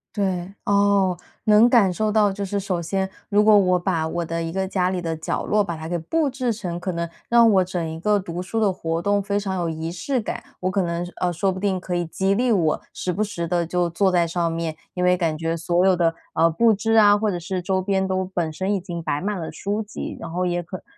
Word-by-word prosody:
对， 190 -2 -1
哦， 200 -2 +3 0.3
能 215 +1 +6
感 220 -7 +5
受 215 +3 0
到。 210 -2 +3
就 200 0 -4
是 200 +1 -2
首 190 -3 -2
先 190 +3 -1 0.2
如 205 0 +3
果 215 -1 +7
我 180 -1 +3
把 175 -3 -1
我 170 +1 -2
的 165 +1 -3
一 165 - -3
个 190 0 -1
家 185 -1 0
里 185 -1 -2
的 165 -1 -2
角 160 - -3
落 210 0 +2
把 175 -4 -2
它 160 0 -7
给 175 - -1
布 295 - 0
置 255 -3 -1
成， 180 -5 -5
可 180 0 -3
能 170 0 -3 0.2
让 235 -1 +6
我 190 -2 +4
整 175 -2 -3
一 160 0 -6
个 210 +3 +2
读 175 -3 -4
书 185 +5 -5
的 200 -3 +3
活 165 -2 -3
动 200 +2 +1
非 200 +1 -1
常 195 -2 -2
有 175 - -1
仪 160 +1 -4
式 235 +9 -2
感， - - -4 0.2
我 185 +1 0
可 195 0 +1
能， 170 0 -2
呃， 175 -1 0
说 190 +3 +1
不 185 - -5
定 195 -2 0
可 180 -1 -4
以 175 - 0
激 190 +4 0
励 245 +4 +1
我 165 -6 +1
时 180 - -3
不 195 +5 -2
时 190 -5 -2
地 170 0 0
就 175 0 0
坐 190 +3 +2
在 175 -2 +3
上 170 0 -1
面， 165 -1 -3 0.2
因 180 - -2
为 180 0 +4
感 165 -3 0
觉 165 +1 -2
所 175 +2 +1
有 185 -2 +4
的， 165 -1 +2 0.2
呃， 165 +1 +4
布 225 +7 +3
置 225 +2 -1
啊， 205 -2 +6
或 215 +1 0
者 180 - -2
是 180 +2 -3
周 190 +1 0
边 190 0 0
都 190 0 0
本 165 -3 -1
身 190 +5 -1
已 200 - 0
经 175 -2 -6
摆 145 - -1
满 205 +2 -2
了 165 - -5
书 205 +2 -3
籍， 210 - -6
然 165 - -7
后 180 +1 -1
也 175 0 -1
可 180 +3 -7
能 - - -19
185 Hz, 285 characters per minute, -23 LUFS, 170-200 Hz, 0.3 s, 果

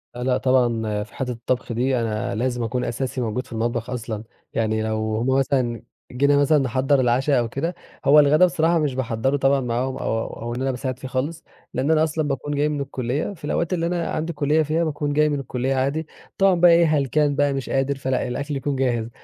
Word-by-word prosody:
لأ، 125 - -4
لأ، 130 0 +2
طبعًا 115 -5 +1
في - - -16
حِتّة 125 -2 -3
الطّبخ 120 +1 -3
دي 125 +2 +1
أنا 110 -3 -2
لازم 120 +1 -1
أكون 125 +2 -2
أساسي 125 +2 -3
موجود 120 +2 -2
في - - -19
المطبخ 115 +1 -2
أصلًا، 115 -3 -4 0.3
يعني 110 -1 0
لو 110 0 -1
هُم 120 - -1
مثلًا 125 -4 0 0.3
جينا 140 +3 +3
مثلًا 145 +2 +4
نِحَضّر 135 +1 +2
العشا 130 +2 +2
أو 115 -1 -1
كده، 165 +8 -3 0.3
هو 145 +2 +7
الغدا 150 +4 +6
بصراحة 170 -1 +2
مش 145 -4 -1
باحضّرُه 130 +2 0
طبعًا 135 0 +2
معاهم، 125 +2 -2
أو 115 -3 -1 0.2
أو 120 +1 -4
إن 130 - -4
أنا 135 - +1
باساعد 130 0 -4
فيه 130 - -6
خالص، 135 +6 -3 0.3
لإن 135 +5 0
أنا 155 -1 +4
أصلًا 155 -1 -1
باكون 145 +1 -2
جاي 150 +1 +1
من 145 -2 -2
الكُلِّيّة 135 +6 -3
في 160 - -10
الأوقات 170 +4 -1
اللي 170 -1 0
أنا 175 -1 -1
عندي 160 +2 -2
كُلِّيّة 150 +1 +2
فيها 155 +3 0
باكون 145 -2 -2
جاي 150 +1 +3
من 145 -1 -1
الكُلِّيّة 130 0 -2
عادي، 140 +4 -1 0.3
طبعًا 195 -1 +4
بقى 175 0 +6
إيه 170 0 +6
هلكان 150 -1 +2
بقى 145 0 +2
مش 135 -1 -4
قادر، 135 +1 0
فلأ، 130 -2 -1
الأكل 140 +4 -3
يكون 140 +1 -2
جاهز، 120 -4 0
135 Hz, 215 wpm, -23 LUFS, 120-145 Hz, 0.3 s, هو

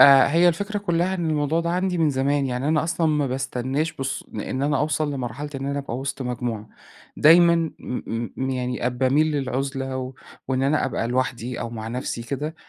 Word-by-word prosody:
آآ 135 -1 +9
هي 170 +3 +5
الفكرة 200 +5 -1
كلها 180 -1 0
إن 170 -3 -1
الموضوع 155 +2 +1
ده 170 0 -1
عندي 180 0 0
من 160 -3 +3
زمان، 140 +1 +1
يعني 125 +3 -2
أنا 155 0 +2
أصلًا 165 0 0
ما 150 -2 +2
باستناش 135 +4 -1
بالص 135 0 -4
لإن 130 - -3
أنا 145 -1 +2
أوصل 150 0 0
لمرحلة 135 +2 -4
إن 135 0 -3
أنا 140 0 -1
أبقى 130 -3 -4
وسط 135 0 -4
مجموعة، 120 -3 -3 0.5
دايمًا 170 +2 +7 0.3
م 115 -2 -4
م 130 0 -1
يعني 125 -1 -2
آآ 125 - +4
باميل 130 +5 +2
للعزلة 135 -1 -2
و 130 0 -5 0.3
وإن 130 0 +1
أنا 145 +3 +2
أبقى 120 -3 -1
لوحدي، 125 -1 -1
أو 115 - -4
مع 110 -1 -5
نفسي 120 -1 -3
كده، 145 +6 -4
135 Hz, 195 wpm, -24 LUFS, 130-155 Hz, 0.5 s, آآ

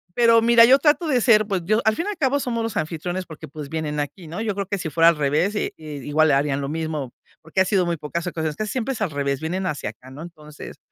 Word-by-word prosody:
Pero 230 -1 +5
mira, 230 0 +7
yo 265 +3 +6
trato 295 +3 +2
de 260 -5 +2
ser 215 -3 +5
pues 195 -4 -1
yo 215 +4 +2
al 220 0 +3
fin 335 - -3
y - - -1
al 415 - -4
cabo 285 -3 +1
somos 235 -4 -2
los 225 -2 -4
anfitriones, 175 +4 -3
porque, 160 0 -10
pues 145 0 -9
vienen 155 -1 -3
aquí, 145 +5 -5
¿no? 170 +7 -5
Yo 215 -3 -2
creo 200 0 -2
que 200 0 -2
si 165 - -4
fuera 165 +2 +5
al 170 - +2
revés, 150 +7 +1
i - - -1
i 160 - -14 0.2
igual 155 +1 +3
le - - +4
harían 140 0 0
lo 140 - -4
mismo, 155 -4 -4 0.3
porque 165 +4 0
ha - - +4
sido 185 -2 +1
muy 170 -1 -1
pocas 155 +3 -4
ocasiones 160 -3 -3
que 215 - -3
siempre 255 +3 -2
es 225 - -8
al 200 -6 0
revés, 140 -2 -2
vienen 185 +4 -2
hacia 145 -9 -3
acá, 125 +4 -17
¿no? 145 +4 -9
Entonces, 150 -3 -11
170 Hz, 280 wpm, -22 LUFS, 150-220 Hz, 0.3 s, mira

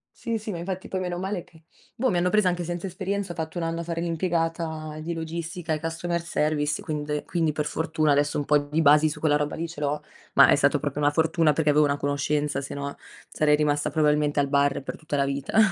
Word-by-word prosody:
Sì, 230 -1 -2
sì 215 0 -5
ma 175 - -4
infatti 185 +2 -5
poi 190 - -2
meno 180 -1 -3
male 190 0 -3
che, 160 -1 -21 0.3
boh, 255 +2 +1
mi 180 - +1
hanno 175 +1 +2
presa 210 -2 +3
anche 175 -1 -2
senza 175 +2 -4
esperienza, 195 +1 -3
ho - - -7
fatto 160 +1 -5
un 170 - -1
anno 165 0 -2
a 170 - -3
fare 165 0 -3
l'impiegata 165 -2 -2
di 170 +2 -3
logistica 165 +1 -5
e 155 - -1
customer 165 +2 -2
service 150 -3 0
quinde 150 -1 -3
quindi 165 -3 0
per 150 0 -2
fortuna 155 -1 0
adesso 145 +1 +2
un 145 - 0
po' 150 - +4
di 145 +2 -1
basi 150 +1 +6
su - - -6
quella 150 -2 +3
roba 150 0 -2
lì 170 - -3
ce 165 - -9
l'ho. 150 +1 -1 0.3
Ma - - +7
è - - +6
stato - - +3
proprio 150 - -3
una 145 0 +4
fortuna, 160 0 +2
perché 150 0 +1
avevo 150 +1 +5
una 140 0 0
conoscenza, 145 0 -1
se 140 - -6
no 140 0 -4 0.3
sarei 150 -1 +3
rimasta 150 0 +1
probabilmente 150 -1 +2
al 140 - 0
bar 140 -1 +2
per - - -6
tutta 155 -2 -4
la 140 -1 +2
vita. 140 +8 -2
155 Hz, 240 wpm, -25 LUFS, 150-170 Hz, 0.3 s, Ma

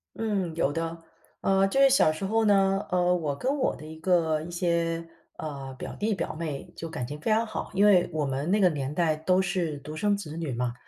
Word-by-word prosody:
嗯， 200 -7 -1
有 145 -3 +1
的。 165 0 -4 0.4
呃， 195 0 +3
就 270 +8 0
是 275 - +7
小 255 -12 +5
时 155 +5 -4
候 220 +2 +2
呢， 195 -1 +3
呃， 180 0 +3
我 150 -5 -2
跟 270 - -1
我 260 - +1
的 155 - -11
一 160 +1 -9
个 160 -3 +2
一 175 - -8
些， 170 -1 -1 0.3
呃， 140 -3 -6
表 - - -6
弟 215 +1 0
表 190 - -3
妹 155 -4 -5
就 165 - -6
感 125 -7 -4
情 150 +1 -7
非 215 - -1
常 225 +1 +3
好。 215 - -5
因 200 +2 +4
为 180 -4 +5
我 155 -2 0
们 140 +6 -2
那 210 - +3
个 185 -2 +5
年 140 -2 -3
代 160 -2 +2
都 185 +4 +2
是 175 -5 -1
独 150 +2 -8
生 205 +5 +1
子 165 -6 -7
女 160 -5 -3
嘛， 120 0 -2
170 Hz, 250 characters per minute, -27 LUFS, 155-195 Hz, 0.4 s, 是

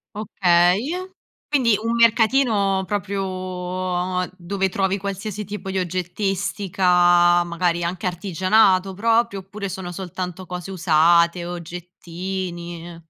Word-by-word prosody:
Okay. 185 +1 +2 0.6
Quindi 240 -8 +3
un 230 +1 -1
mercatino 225 -4 +3
proprio 200 0 -2 1.2
dove 190 +2 -2
trovi 195 +1 0
qualsiasi 200 +1 -5
tipo 205 -1 -6
di 190 - -2
oggettistica, 180 -1 +2
magari 170 0 -1
anche 175 +2 -3
artigianato 185 +2 +2
proprio, 230 0 +1
oppure 200 +1 -7
sono 180 -1 -6
soltanto 185 0 -6
cose 180 +1 -6
usate, 170 0 +3
oggettini? 175 0 -7
185 Hz, 95 wpm, -22 LUFS, 175-200 Hz, 1.2 s, Quindi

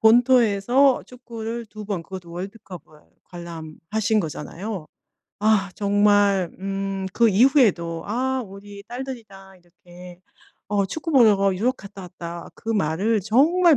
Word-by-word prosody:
본토에서 245 +2 +4
축구를 235 -2 -7
2 215 -1 -10
번 195 -5 -3
그것도 180 -1 -9
월드컵을 180 -3 -9 0.2
관람하신 170 +5 -3
거잖아요. 175 +3 -6 0.5
아 210 -2 +2
정말 205 -2 +3
음 195 0 -3
그 235 -1 +4
이후에도 200 - +3
아 255 +4 -1
우리 200 0 -11
딸들이 250 +2 -6
다 195 -2 -15
이렇게 175 0 -15 0.5
어 200 -1 +1
축구 315 - -5
보러 205 -7 +5
유럽 245 +7 0
갔다 200 -1 -11
왔다 170 -1 -8
그 225 - -11
말을 205 +2 +1
정말 305 - +4
200 Hz, 255 characters per minute, -23 LUFS, 185-230 Hz, 0.5 s, 보러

